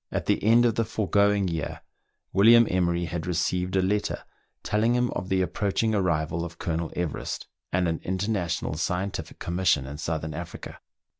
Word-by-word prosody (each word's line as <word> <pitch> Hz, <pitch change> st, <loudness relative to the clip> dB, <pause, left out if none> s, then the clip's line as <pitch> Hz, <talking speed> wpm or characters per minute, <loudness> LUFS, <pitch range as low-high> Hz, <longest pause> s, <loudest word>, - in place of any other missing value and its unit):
^ -, -, -1 dB
the -, -, +1 dB
end 115 Hz, +3 st, +5 dB
of 115 Hz, -, +3 dB
the 115 Hz, -, +1 dB
foregoing 100 Hz, -2 st, +2 dB
year, 80 Hz, -4 st, -3 dB, 0.5 s
William 115 Hz, +5 st, +7 dB
Emery 85 Hz, -1 st, +1 dB
had 85 Hz, 0 st, -4 dB
receive«j 90 Hz, +2 st, 0 dB
a -, -, +2 dB
letter 105 Hz, +2 st, -1 dB, 0.4 s
telling 110 Hz, +3 st, +2 dB
him 125 Hz, 0 st, +1 dB
of 90 Hz, -, -4 dB
the 95 Hz, -1 st, +2 dB
approaching 100 Hz, +5 st, 0 dB
arrival 85 Hz, -4 st, 0 dB
of 85 Hz, 0 st, -7 dB
Colonel 80 Hz, -1 st, -2 dB
Everest, 85 Hz, -4 st, -3 dB, 0.3 s
and 90 Hz, 0 st, +1 dB
an 80 Hz, -1 st, -1 dB
international 95 Hz, -4 st, -1 dB
scientific 90 Hz, +1 st, -3 dB
commission 85 Hz, -6 st, +1 dB
in 70 Hz, +2 st, -7 dB
South 80 Hz, -1 st, -2 dB
ern 80 Hz, 0 st, -4 dB
Africa. 85 Hz, +3 st, -7 dB
90 Hz, 165 wpm, -26 LUFS, 85-100 Hz, 0.5 s, William